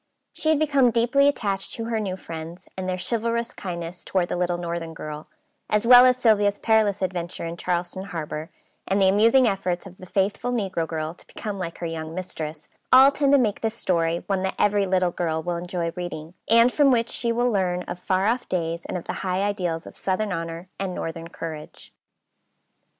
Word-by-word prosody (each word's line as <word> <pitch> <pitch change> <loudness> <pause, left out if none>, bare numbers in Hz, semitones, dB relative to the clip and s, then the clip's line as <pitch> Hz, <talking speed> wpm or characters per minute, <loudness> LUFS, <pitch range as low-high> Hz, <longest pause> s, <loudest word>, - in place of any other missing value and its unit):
She 315 - -1
had 315 - +4
become 280 -4 +3
deeply 240 +5 +3
attached 200 -8 -1
to 225 - -4
her 230 -1 -1
new 190 -3 -3
friends, 165 +1 -8
and 185 -1 -3
their 185 - -1
chivalrous 235 +3 -1
kindness 175 -2 -6
toward 180 -2 0
the - - -1
little 175 0 0
northern 170 -1 -4
girl, 150 0 -7 0.4
as 210 +1 +1
well 245 +1 +9
as 250 0 +3
Sylvia's 210 -4 +3
perilous 215 -3 +2
adventure 175 -2 -3
in 165 0 -4
Charleston 175 +2 -2
Harbor, 160 -3 -5 0.4
and 195 +1 +1
the 190 - +5
amusing 230 +6 +5
efforts 185 -3 -1
of 185 -1 -12
the 185 - -11
faithful 200 +6 0
negro 190 -8 -1
girl 155 0 -3
to - - -19
become 205 -3 -6
like 170 -2 -5
her 175 - -5
young 160 -1 -5
mistress, 155 -4 -6 0.2
all 265 +2 +9
tend 280 -1 +1
to - - +8
make 220 -6 +1
this 225 0 -1
story 170 -5 0
one 195 -2 0
that 190 0 -2
every 205 -1 +2
little 185 -1 +2
girl 160 -2 -2
will 175 0 -2
enjoy 175 -1 -3
reading, 175 -2 -6 0.2
and 230 +2 +6
from 290 -2 +5
which 235 -2 +2
she 235 - 0
will 240 +1 +1
learn 180 -3 0
of 175 0 -6
far 185 +1 0
off 235 +3 0
days 170 -2 -2
and - - -3
of 175 - -8
the - - -3
high 185 +1 0
ideals 180 -5 -2
of - - -11
southern 200 +2 -1
honor 165 +1 -5
and 190 -2 -3
northern 165 0 -5
courage. 160 -2 -8
185 Hz, 200 wpm, -24 LUFS, 170-220 Hz, 0.4 s, well